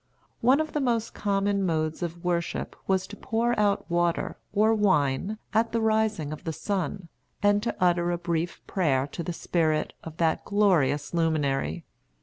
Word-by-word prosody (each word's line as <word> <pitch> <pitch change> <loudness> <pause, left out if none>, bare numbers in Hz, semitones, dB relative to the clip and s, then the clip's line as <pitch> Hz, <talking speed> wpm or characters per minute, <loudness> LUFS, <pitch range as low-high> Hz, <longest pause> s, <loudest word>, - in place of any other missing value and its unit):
One 255 +5 +4
of 315 0 -2
the 300 - 0
most 235 -4 0
common 200 -1 0
modes 160 -2 -1
of 170 0 -4
worship 170 -1 -2
was 190 -1 +2
to 205 - -10
pour 235 +1 0
out 205 -1 +2
water, 175 -1 0 0.2
or 215 +2 +3
wine, 190 -2 +1 0.2
at 225 +1 +2
the 230 - +2
rising 220 -8 +1
of 155 - -9
the 165 - -2
sun, 190 +1 -3 0.4
and 205 0 +4
to 230 - -2
utter 175 -1 +3
a 175 - 0
brief 170 0 -3
prayer 140 -8 +1
to 145 +4 -6
the 170 - -3
Spirit 160 -2 0
of 160 -1 -9
that 165 -1 +1
glorious 160 -9 +2
luminary. 145 - 0
180 Hz, 165 wpm, -27 LUFS, 160-210 Hz, 0.4 s, One